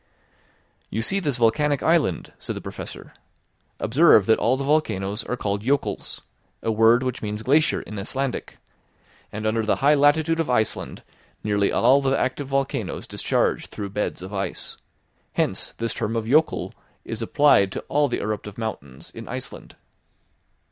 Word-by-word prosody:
"You 110 Hz, +2 st, -2 dB
see 195 Hz, -, +1 dB
this 145 Hz, -9 st, 0 dB
volcanic 140 Hz, +5 st, +2 dB
island," 160 Hz, -, +1 dB
said -, -, -5 dB
the -, -, -4 dB
Professor; -, -, -8 dB, 0.7 s
"observe 130 Hz, -, +5 dB
that 110 Hz, -, +3 dB
all 125 Hz, +3 st, +2 dB
the 135 Hz, -, -3 dB
volcanoes 115 Hz, -8 st, 0 dB
are 125 Hz, -, -3 dB
called 100 Hz, -2 st, -2 dB
jokuls, 140 Hz, +5 st, -1 dB, 0.4 s
a 115 Hz, -, +1 dB
word 115 Hz, +3 st, +5 dB
which 130 Hz, -1 st, -3 dB
means 105 Hz, 0 st, -4 dB
glacier 150 Hz, +5 st, +3 dB
in 105 Hz, -1 st, -7 dB
Icelandic, 130 Hz, +6 st, -3 dB, 0.7 s
and 105 Hz, +1 st, -5 dB
under 110 Hz, +1 st, +1 dB
the 110 Hz, -, +2 dB
high 145 Hz, +2 st, +4 dB
latitude 155 Hz, +3 st, +3 dB
of 165 Hz, -, 0 dB
Iceland 110 Hz, -3 st, -1 dB, 0.4 s
nearly 105 Hz, -1 st, +1 dB
all 140 Hz, +2 st, +4 dB
the 135 Hz, 0 st, +1 dB
active 135 Hz, +2 st, -1 dB
volcanoes 135 Hz, 0 st, -2 dB
discharge -, -, 0 dB
through 100 Hz, -1 st, -6 dB
beds 105 Hz, -3 st, -3 dB
of 95 Hz, +2 st, -8 dB
ice. 95 Hz, -1 st, -3 dB, 0.6 s
Hence -, -, -1 dB
this 115 Hz, 0 st, -2 dB
term 110 Hz, +2 st, -2 dB
of 115 Hz, -1 st, -1 dB
jokul 150 Hz, +7 st, +2 dB, 0.3 s
is 115 Hz, 0 st, -4 dB
applied 115 Hz, -5 st, +4 dB
to -, -, -4 dB
all 145 Hz, 0 st, +1 dB
the 125 Hz, -, -2 dB
eruptive 105 Hz, -1 st, -4 dB
mountains 70 Hz, -, -6 dB
in -, -, -9 dB
Iceland." -, -, -7 dB
115 Hz, 155 wpm, -24 LUFS, 105-140 Hz, 0.7 s, observe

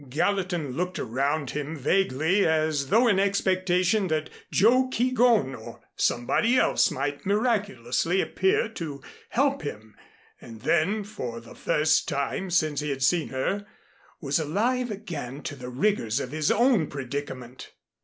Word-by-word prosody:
Gallatin 175 Hz, 0 st, -1 dB
looked 180 Hz, +6 st, -3 dB
around 140 Hz, +4 st, -1 dB
him 150 Hz, +2 st, -4 dB
vaguely, 165 Hz, +4 st, +2 dB
as 155 Hz, -3 st, +1 dB
though 235 Hz, +3 st, +4 dB
in 200 Hz, -4 st, +3 dB
expectation 190 Hz, 0 st, +1 dB
that 155 Hz, -2 st, -2 dB, 0.2 s
Joe 255 Hz, +5 st, +4 dB
Keegón 240 Hz, -, +2 dB
or 110 Hz, -, -10 dB, 0.2 s
somebody 225 Hz, -, +1 dB
else -, -, +3 dB
might 140 Hz, +2 st, -3 dB
miraculously 195 Hz, -, 0 dB
appear 190 Hz, +3 st, +1 dB
to 150 Hz, -10 st, -7 dB, 0.3 s
help 275 Hz, +2 st, +1 dB
him, 110 Hz, -6 st, -7 dB, 0.5 s
and 115 Hz, -2 st, -11 dB
then 195 Hz, -, +1 dB
for 125 Hz, -, -6 dB
the 115 Hz, 0 st, -13 dB
first 155 Hz, +1 st, +1 dB
time 140 Hz, +7 st, -2 dB
since 155 Hz, -4 st, +1 dB
he 150 Hz, 0 st, -3 dB
had 135 Hz, -1 st, -2 dB
seen 165 Hz, +4 st, +2 dB
her, 195 Hz, +10 st, -2 dB, 0.5 s
was 140 Hz, 0 st, 0 dB
alive 235 Hz, -, 0 dB
again 155 Hz, -, -6 dB
to 145 Hz, -, -5 dB
the 125 Hz, -2 st, -8 dB
rigors 125 Hz, -, 0 dB
of 125 Hz, -, -5 dB
his 155 Hz, 0 st, 0 dB
own 235 Hz, -, +3 dB
predicament. 130 Hz, -2 st, -6 dB
160 Hz, 140 wpm, -26 LUFS, 135-200 Hz, 0.5 s, though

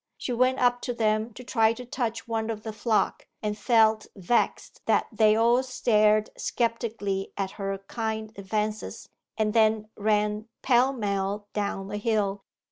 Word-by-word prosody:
She 250 Hz, -, -3 dB
went 255 Hz, +2 st, +2 dB
up 245 Hz, -1 st, +2 dB
to 245 Hz, -, -3 dB
them 215 Hz, 0 st, +1 dB
to 250 Hz, -, -9 dB
try 225 Hz, -2 st, +3 dB
to 250 Hz, +1 st, -9 dB
touch 230 Hz, -2 st, -3 dB
one 225 Hz, -1 st, -2 dB
of 215 Hz, -2 st, -4 dB
the 220 Hz, -, -5 dB
flock, 215 Hz, -2 st, 0 dB, 0.2 s
and 210 Hz, 0 st, -1 dB
felt 220 Hz, -1 st, +3 dB
vexed 200 Hz, +5 st, -1 dB
that -, -, +3 dB
they 215 Hz, -1 st, +4 dB
all 235 Hz, +3 st, +4 dB
stared 215 Hz, -4 st, +2 dB
sceptically 225 Hz, -4 st, -2 dB
at 195 Hz, -1 st, -2 dB
her 195 Hz, -1 st, -3 dB
kind 220 Hz, -1 st, -3 dB
advances, 210 Hz, +2 st, -3 dB, 0.3 s
and 215 Hz, -1 st, +1 dB
then 220 Hz, -1 st, +3 dB
ran 210 Hz, +1 st, 0 dB, 0.2 s
pell 255 Hz, +1 st, +4 dB
mell 205 Hz, -3 st, -2 dB
down 200 Hz, -2 st, -2 dB
the 205 Hz, +1 st, -4 dB
hill. 205 Hz, -2 st, 0 dB
220 Hz, 155 wpm, -27 LUFS, 210-230 Hz, 0.3 s, they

